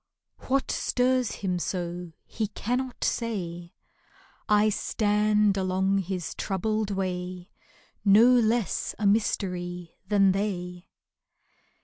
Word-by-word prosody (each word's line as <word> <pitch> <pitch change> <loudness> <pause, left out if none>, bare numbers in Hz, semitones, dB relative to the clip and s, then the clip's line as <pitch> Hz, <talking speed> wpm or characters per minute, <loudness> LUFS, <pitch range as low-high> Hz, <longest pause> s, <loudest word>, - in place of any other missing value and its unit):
What 270 +1 +1
stirs 255 -1 +1
him 180 -1 0
so 175 -1 -4
he 220 -1 -3
can 240 +4 -2
not 260 -2 -5
say: 175 -7 -3 0.7
I 210 0 +5
stand 210 -1 +2
along 190 +1 +1
his 185 -2 -4
troubled 215 +2 -1
way 185 -1 -4 0.5
No 210 +3 +7
less 240 -3 +2
a 210 - -2
mystery 180 -4 -1
than 195 -1 +4
they. 180 -3 -3
195 Hz, 100 wpm, -27 LUFS, 180-215 Hz, 0.7 s, No